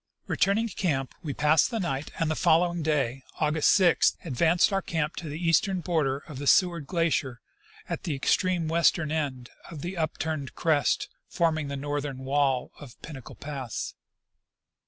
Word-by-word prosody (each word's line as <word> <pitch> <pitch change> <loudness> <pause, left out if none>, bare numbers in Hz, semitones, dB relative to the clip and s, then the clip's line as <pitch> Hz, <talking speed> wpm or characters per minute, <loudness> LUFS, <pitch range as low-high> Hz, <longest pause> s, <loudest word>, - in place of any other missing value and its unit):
Returning 210 +4 +1
to 210 - -9
camp, 140 -9 -1
we 155 -5 -4
passed 150 +1 +4
the 230 -3 -2
night, 155 -6 -2
and 160 -1 0
the - - 0
following 170 +2 +2
day, 140 -4 0 0.2
August 155 0 +2
6, 185 -3 +4
advanced 170 - +2
our 195 - +1
camp 160 -3 -2
to 165 - -5
the 145 - -5
eastern 175 +3 +2
border 145 -6 0
of 145 -5 -8
the 145 - -4
Seward 170 -5 +3
glacier 165 -8 0 0.5
at - - -4
the 155 - -2
extreme 175 +4 +1
western 165 -1 +2
end 135 -6 -3 0.2
of 155 -4 -8
the 180 +2 -5
upturned 155 -3 -3
crest 155 -4 +1 0.2
forming 160 -3 0
the 140 0 -4
northern 145 -1 -3
wall 135 -2 +1
of 140 -5 -12
Pinnacle 135 -6 -9
pass. 140 -5 -5
155 Hz, 160 wpm, -27 LUFS, 140-170 Hz, 0.5 s, passed